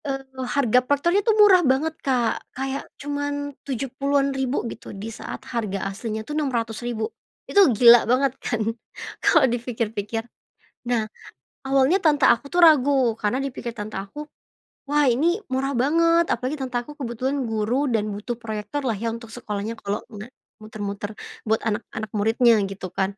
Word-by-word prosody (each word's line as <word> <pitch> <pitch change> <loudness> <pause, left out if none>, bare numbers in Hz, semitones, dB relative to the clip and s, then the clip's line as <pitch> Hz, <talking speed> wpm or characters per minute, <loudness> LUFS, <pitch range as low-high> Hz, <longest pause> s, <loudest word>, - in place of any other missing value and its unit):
Eee, 270 -1 -3 0.3
harga 250 -3 +4
proyektor 285 +6 +1
tuh 435 +1 +2
murah 405 -4 +7
banget, 295 +2 +1
Kak, 245 -4 0 0.2
kayak 270 +1 -4
cuman 285 0 -3
Rp70.000-an 275 0 -1
gitu 230 - -7
di 220 +3 -6
saat - - -8
harga 210 -5 -2
aslinya 220 +1 -5
tuh 300 - -6
Rp.600.000. 240 -5 -2 0.4
Itu 400 -6 +5
gila 235 0 +7
banget 260 +1 +3
kan? 235 -2 -2 0.6
Kalau 320 -5 +5
dipikir-pikir. 230 -3 -2 0.6
Nah 225 -3 0 0.5
awalnya 275 +7 +3
tante 295 -5 +3
aku 280 +5 +3
tuh 350 - -3
ragu 275 -5 +4
karena 210 +4 +1
dipikir 255 -2 -5
tante 210 0 -6
aku, 295 +10 -8 0.6
"Wah 290 -1 +3
ini 335 - +2
murah 265 +1 -1
banget," 330 +6 +3
apalagi 270 +3 -2
tante 255 -2 -2
aku 240 +5 -5
kebetulan 265 0 -3
guru 225 +6 0
dan 220 -3 +1
butuh 220 +4 -5
proyektor 220 +4 -5
lah 240 - +1
ya 225 +3 -3
untuk 230 0 -7
sekolahnya 215 -2 -4
kalau 200 +1 -3
nggak, 210 +3 -8 0.3
muter-muter, 210 0 -6 0.2
buat 220 0 +1
anak-anak 215 0 -3
muridnya 225 +3 +4 0.2
gitu 185 -2 -7
kan. 195 +2 -1
245 Hz, 150 wpm, -23 LUFS, 220-280 Hz, 0.6 s, murah